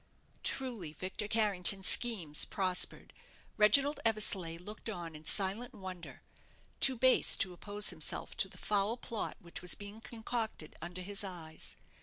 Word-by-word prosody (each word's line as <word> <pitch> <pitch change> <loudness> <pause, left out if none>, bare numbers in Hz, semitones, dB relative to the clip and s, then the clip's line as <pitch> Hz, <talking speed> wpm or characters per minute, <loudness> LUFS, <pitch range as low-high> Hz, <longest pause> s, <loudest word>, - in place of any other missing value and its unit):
Truly, 230 - -2
Victor 185 +5 -5
Carrington's 200 -3 +1
schemes 185 -12 +5
prospered. 185 -3 +2 0.4
Reginald 275 +8 +4
Eversleigh 200 -7 0
looked 210 +6 -7
on 170 -6 -7
in 155 +1 -12
silent 200 +7 -1
wonder 185 -3 -9 0.6
too 265 -2 +6
base 260 +2 +5
to 185 - 0
oppose 205 +3 0
himself - - -3
to - - +2
the - - -11
foul 210 +3 0
plot 230 -3 -5
which 170 -5 -9
was 180 - +1
being 205 +2 -11
concocted 225 -7 -5
under 175 +2 -7
his 200 +2 -3
eyes. 170 -5 -7
200 Hz, 140 wpm, -33 LUFS, 180-225 Hz, 0.6 s, too